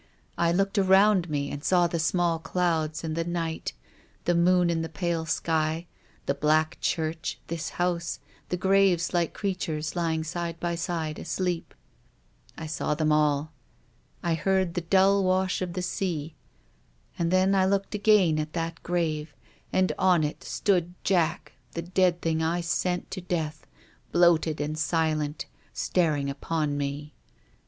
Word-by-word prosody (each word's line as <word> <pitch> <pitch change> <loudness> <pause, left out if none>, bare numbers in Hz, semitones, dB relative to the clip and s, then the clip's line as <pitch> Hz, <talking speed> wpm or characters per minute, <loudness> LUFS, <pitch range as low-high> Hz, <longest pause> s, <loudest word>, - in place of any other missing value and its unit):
I 170 0 +2
looked 195 +3 +1
around 190 -1 +4
me 140 -1 -2
and 145 0 -6
saw 180 -2 +4
the 170 -1 -1
small 170 0 +1
clouds 165 -3 -1
and 160 -1 -3
the 165 - 0
night, 165 -1 -3 0.5
the 175 - +3
moon 175 0 +4
in 165 -1 0
the 160 - -4
pale 165 -1 -2
sky, 160 +1 0 0.4
the 140 - +1
black 155 +2 +1
church, 160 -2 -1
this 165 -1 -3
house, 175 -1 -1 0.3
the 180 - -1
graves 190 -2 +3
like 170 -2 0
creatures 165 -6 -2
lying 165 -2 0
side 170 0 -4
by 175 -1 -1
side 165 -2 -3
asleep. 175 0 -3 0.8
I 160 - -6
saw 155 -1 -1
them 155 0 +1
all. 150 0 +2 0.7
I 170 - +1
heard 185 +2 +1
the 175 - -1
dull 195 +3 +4
wash 185 0 +1
of 180 -2 -3
the 180 0 -3
sea. 165 -4 -2 0.9
And 170 -1 +1
then 185 +2 +3
I 190 -1 +3
looked 195 +1 0
again 205 -7 +4
at 155 0 -4
that 165 -1 -3
grave, 155 -4 -2 0.4
and 185 0 +2
on 180 -4 +4
it 150 - -3
stood 180 -3 0
Jack, 170 -3 +1 0.2
the 170 - -3
dead 180 0 +2
thing 160 -1 +1
I 165 +2 0
sent 180 +1 -1
to 185 - -4
death, 160 -4 -3 0.4
bloated 170 -3 +3
and 150 +1 -2
silent, 155 -2 0 0.3
staring 155 -6 +1
upon 145 +1 -2
me. 145 +1 -4
170 Hz, 150 wpm, -27 LUFS, 155-180 Hz, 0.9 s, around